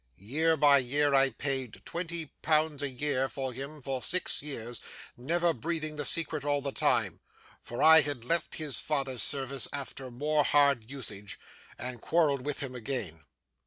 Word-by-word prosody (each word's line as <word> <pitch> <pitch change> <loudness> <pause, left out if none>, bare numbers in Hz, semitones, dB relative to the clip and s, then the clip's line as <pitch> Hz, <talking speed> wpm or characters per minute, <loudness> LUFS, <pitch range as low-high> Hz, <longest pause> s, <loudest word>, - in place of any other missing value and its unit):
Year 155 - 0
by 145 -1 +6
year, 140 +3 +1
I 135 0 +5
paid 135 -3 -2
twenty 170 -3 -4
pounds 155 -1 +2
a 145 - -2
year 135 0 -1
for 130 -2 -4
him 140 +3 -8
for 135 -1 -2
six 180 +6 +1
years; 120 -5 -4 0.3
never 170 +7 0
breathing 155 +2 -3
the 150 - -1
secret 160 -2 +1
all 145 0 +1
the 140 0 -3
time; - - +1 0.4
for 120 - -4
I 160 0 +9
had 140 -5 -3
left 165 +4 0
his 150 -5 0
father's 135 -5 -1
service 135 -2 +2
after 135 -2 -5
more 150 +5 0
hard 140 -7 +3
usage, 105 -7 -6 0.4
and 125 -1 -4
quarrelled 145 -5 +1
with 145 - -2
him 135 -2 -2
again. 110 - -5
140 Hz, 160 wpm, -29 LUFS, 130-155 Hz, 0.4 s, I